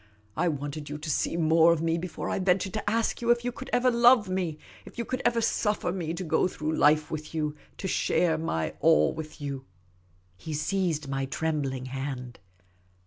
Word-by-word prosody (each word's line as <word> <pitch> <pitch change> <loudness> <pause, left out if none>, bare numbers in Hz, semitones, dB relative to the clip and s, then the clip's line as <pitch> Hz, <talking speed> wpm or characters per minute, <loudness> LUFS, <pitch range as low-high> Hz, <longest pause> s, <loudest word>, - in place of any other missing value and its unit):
I 175 +3 +1
wanted 145 -1 -4
you 150 - -4
to 150 +1 -6
see 165 - 0
more 165 0 +5
of 170 - +2
me 165 0 +1
before 170 -2 -5
I - - -1
ventured 185 0 +1
to 215 -1 -2
ask 230 +2 0
you 235 - -1
if 240 0 +3
you 245 - 0
could - - -9
ever 250 +1 +3
love 235 -2 +5
me, 180 -4 -2 0.3
if - - -14
you 235 - -2
could 255 - -3
ever 235 -1 +2
suffer 210 -5 0
me 170 -4 -3
to 185 - -4
go 170 - +2
through 155 -3 -3
life 150 +1 +3
with 155 +1 -5
you, 150 -1 -1 0.2
to 190 - -4
share 175 -2 +2
my 80 - -2
all 75 +1 +4
with 155 -1 -8
you." 140 -2 -5 0.7
He 155 +11 -6
seized 155 -1 -1
my 135 0 -2
trembling 135 -2 -2
hand. 130 -2 -5
160 Hz, 200 wpm, -28 LUFS, 145-190 Hz, 0.7 s, more